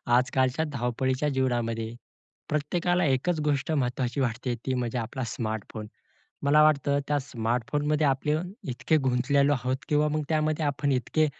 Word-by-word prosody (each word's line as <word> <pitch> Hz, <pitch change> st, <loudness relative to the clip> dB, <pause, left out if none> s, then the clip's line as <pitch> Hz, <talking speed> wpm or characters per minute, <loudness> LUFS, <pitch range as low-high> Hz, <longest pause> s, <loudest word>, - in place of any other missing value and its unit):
आजकालच्या 130 Hz, +4 st, +2 dB
धावपळीच्या 130 Hz, +3 st, 0 dB
जीवनामध्ये, 120 Hz, -4 st, -1 dB, 0.6 s
प्रत्येकाला 175 Hz, +4 st, +1 dB
एकच 145 Hz, +5 st, +1 dB
गोष्ट 145 Hz, 0 st, 0 dB
महत्त्वाची 125 Hz, -2 st, -1 dB
वाटते 120 Hz, 0 st, -1 dB
ती 130 Hz, -, 0 dB
म्हणजे 125 Hz, -1 st, -1 dB
आपला 120 Hz, +3 st, -3 dB
स्मार्टफोन. 110 Hz, -1 st, -4 dB, 0.6 s
मला 150 Hz, +2 st, +5 dB
वाटतं 140 Hz, -2 st, +3 dB
त्या 145 Hz, -, +2 dB
स्मार्टफोनमध्ये 145 Hz, +4 st, 0 dB
आपले 140 Hz, +2 st, +1 dB, 0.4 s
इतके, 130 Hz, +5 st, +1 dB
गुंतलेलो 140 Hz, +1 st, +2 dB
आहोत 130 Hz, -1 st, 0 dB
किंवा 150 Hz, 0 st, +3 dB
मग 155 Hz, +1 st, -1 dB
त्यामध्ये 155 Hz, 0 st, +1 dB
आपण 145 Hz, 0 st, 0 dB
इतके 155 Hz, +4 st, +1 dB
135 Hz, 130 wpm, -27 LUFS, 125-150 Hz, 0.6 s, मला